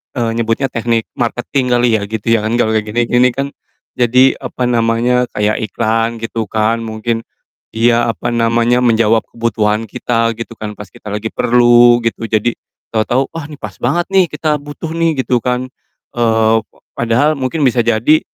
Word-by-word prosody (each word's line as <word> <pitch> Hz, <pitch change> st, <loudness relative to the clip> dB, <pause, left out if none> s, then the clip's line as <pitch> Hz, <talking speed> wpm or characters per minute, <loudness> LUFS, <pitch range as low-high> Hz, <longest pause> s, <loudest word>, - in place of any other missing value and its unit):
eee, 115 Hz, -2 st, 0 dB
nyebutnya 115 Hz, +4 st, 0 dB
teknik 115 Hz, -1 st, -1 dB
marketing 125 Hz, +2 st, -1 dB
kali 120 Hz, 0 st, +3 dB
ya -, -, -5 dB
gitu 110 Hz, 0 st, -5 dB
ya. 115 Hz, -, +4 dB
Kan 110 Hz, +2 st, -1 dB
kalau 110 Hz, -2 st, +2 dB
gini-gini 120 Hz, +3 st, +1 dB
kan 140 Hz, +2 st, -4 dB, 0.4 s
jadi, 125 Hz, +2 st, +4 dB
apa 125 Hz, -, -3 dB
namanya, 120 Hz, +1 st, +2 dB
kayak 105 Hz, +1 st, 0 dB
iklan 115 Hz, +2 st, 0 dB
gitu 115 Hz, 0 st, -3 dB
kan, 110 Hz, +1 st, 0 dB
mungkin, 115 Hz, +1 st, -3 dB, 0.5 s
iya 115 Hz, +1 st, +2 dB
apa -, -, -6 dB
namanya, 120 Hz, +1 st, +2 dB
menjawab 115 Hz, -1 st, +3 dB
kebutuhan 110 Hz, -1 st, -1 dB
kita 115 Hz, 0 st, -1 dB
gitu 115 Hz, +1 st, -7 dB
kan 105 Hz, -1 st, -6 dB
pas 105 Hz, -2 st, -10 dB
kita -, -, -14 dB
lagi 110 Hz, +1 st, -3 dB
perlu 120 Hz, 0 st, +4 dB
gitu, 115 Hz, 0 st, -2 dB
jadi 110 Hz, +2 st, +1 dB, 0.4 s
tahu-tahu, 120 Hz, +4 st, 0 dB
"Wah, 160 Hz, -3 st, -5 dB
nih 150 Hz, -, -10 dB
pas 105 Hz, -, -5 dB
banget 145 Hz, +8 st, +1 dB
nih 190 Hz, -2 st, +4 dB
kita 150 Hz, 0 st, 0 dB
butuh 145 Hz, +2 st, -7 dB
nih." 165 Hz, -5 st, 0 dB
Gitu 125 Hz, -2 st, +1 dB
kan, 125 Hz, +1 st, -1 dB, 0.5 s
eee, 115 Hz, -1 st, +3 dB
p -, -, -52 dB, 0.3 s
padahal 130 Hz, +6 st, +1 dB
mungkin 135 Hz, +4 st, -1 dB
bisa 125 Hz, -2 st, +2 dB
jadi, 120 Hz, +7 st, +3 dB
115 Hz, 165 wpm, -15 LUFS, 115-125 Hz, 0.5 s, ya